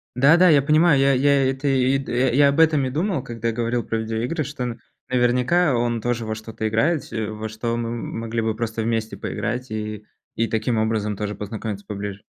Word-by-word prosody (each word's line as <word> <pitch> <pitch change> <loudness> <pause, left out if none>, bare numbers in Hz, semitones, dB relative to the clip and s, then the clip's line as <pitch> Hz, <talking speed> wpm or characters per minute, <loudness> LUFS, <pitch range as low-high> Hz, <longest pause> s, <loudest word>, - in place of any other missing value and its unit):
Да-да, 160 +8 +6
я 145 -3 +6
понимаю. 155 0 +4
Я 140 0 +4
я, 140 +1 +3
и 130 - +2
это 140 +2 -4
и 135 0 +3
д 135 - -6
э, 125 0 +2
я 140 0 +6
об 140 - 0
этом 155 -4 +4
и 130 - -3
думал, 165 -1 -1
когда 115 -1 -3
говорил 120 +1 -1
про 115 - -2
видеоигры, 115 +8 -2
что 140 -2 -5
н 120 -1 -4 0.3
наверняка 125 +6 +2
он 120 -1 0
тоже 120 -1 -1
во 110 0 -3
что-то 110 0 -5
играет, 145 +9 +1
се 110 -1 -4
во 110 +1 -5
что 115 +2 -3
мы, 115 -1 -3
м 115 -1 -5
могли 115 0 -2
бы 110 -1 -1
просто 115 -1 -3
вместе 110 -1 -2
поиграть 125 +1 -4
и 105 -1 -5 0.3
и 115 0 0
таким 110 +1 -1
образом 110 -1 0
тоже 105 -1 -3
познакомиться 105 -1 -6
поближе. 100 -1 -5
120 Hz, 215 wpm, -22 LUFS, 110-135 Hz, 0.3 s, Да-да